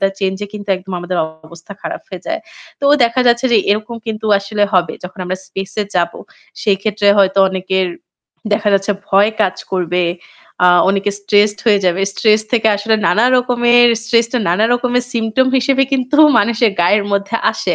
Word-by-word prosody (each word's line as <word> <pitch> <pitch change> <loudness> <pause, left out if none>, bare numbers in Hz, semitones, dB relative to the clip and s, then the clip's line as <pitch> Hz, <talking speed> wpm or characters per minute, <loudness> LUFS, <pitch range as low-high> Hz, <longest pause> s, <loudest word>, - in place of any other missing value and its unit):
তা 195 - +3
change-এ 195 +1 -3
কিন্তু 205 -1 -9
একদম 190 +1 -10
আমাদের 175 +1 -4 0.3
অবস্থা 170 +4 -13
খারাপ - - -6
হয়ে 185 -2 -9
যায়। 330 +1 -3 0.4
তো 280 - -4 0.2
দেখা 235 +2 0
যাচ্ছে 240 +2 +3
যে - - +5
এরকম 215 +3 -2
কিন্তু 220 -1 -4
আসলে 205 +1 -3
হবে 175 -4 +1
যখন 185 +2 -10
আমরা 180 +1 -3
space-এ 195 +2 -5
যাব। 170 -1 0 0.5
সেই 205 -3 +2
ক্ষেত্রে 210 -1 0
হয়তো 195 0 +3
অনেকের 190 0 -1 0.7
দেখা 205 0 +1
যাচ্ছে 195 +1 0 0.2
ভয় 200 +2 +3
কাজ 190 -3 +1 0.2
করবে, 180 -1 -1 0.6
আ - - +6 0.2
অনেকে 200 +1 0
stressed 205 +1 +2
হয়ে 205 -3 +4
যাবে। 180 +1 +1
Stress 215 +1 +2
থেকে 225 -2 +2
আসলে 220 +2 0
নানা 220 - +2
রকমের 240 -1 +3
stress 230 0 +2
টা 250 - +1
নান 175 +4 0
রকমের 245 0 -1
symptom 230 +3 +1
হিসেবে 270 +1 +1
কিন্তু 265 +2 0 0.2
মানুষের 230 +1 +2
গায়ের 200 +4 +2
মধ্যে 200 +3 -1 0.2
আসে। - - -2
205 Hz, 170 wpm, -15 LUFS, 190-235 Hz, 0.7 s, আ